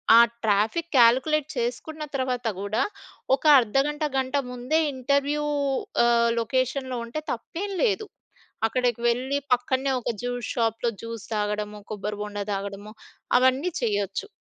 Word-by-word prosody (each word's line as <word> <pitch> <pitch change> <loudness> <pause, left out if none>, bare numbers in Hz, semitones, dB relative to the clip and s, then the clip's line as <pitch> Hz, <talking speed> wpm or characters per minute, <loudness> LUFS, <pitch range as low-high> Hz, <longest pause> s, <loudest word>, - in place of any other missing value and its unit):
ఆ 235 - +10 0.2
traffic 220 +11 +1
calculate 265 +5 +5
చేసుకున్న 250 +6 -3
తర్వాత 255 -3 -1
గూడా, 200 +5 -1 0.5
ఒక - - -17 0.2
అర్ధగంట 275 +6 0
గంట 265 +1 0
ముందే 250 +6 0
ఇంటర్వ్యూ 280 +3 0 0.6
ఆహ్, 235 0 +4
లొకేషన్‌లో 255 +2 -1
ఉంటే 235 +6 -4
తప్పేం 350 - -4
లేదు. 430 -2 +1 0.6
అక్కడికి 245 0 0
వెళ్ళి 260 +4 0 0.2
పక్కనే 260 +2 -1
ఒక 240 - -2
జ్యూస్ 245 -2 -3
షాప్‌లో 230 0 0
జ్యూస్ 230 -2 -6
తాగడము. 210 0 -2
కొబ్బరిబొండ 210 0 -4
తాగడము 200 +1 -5 0.5
అవన్నీ 260 +7 +2
చేయొచ్చు. 205 - -1
245 Hz, 115 wpm, -25 LUFS, 215-270 Hz, 0.6 s, ఆ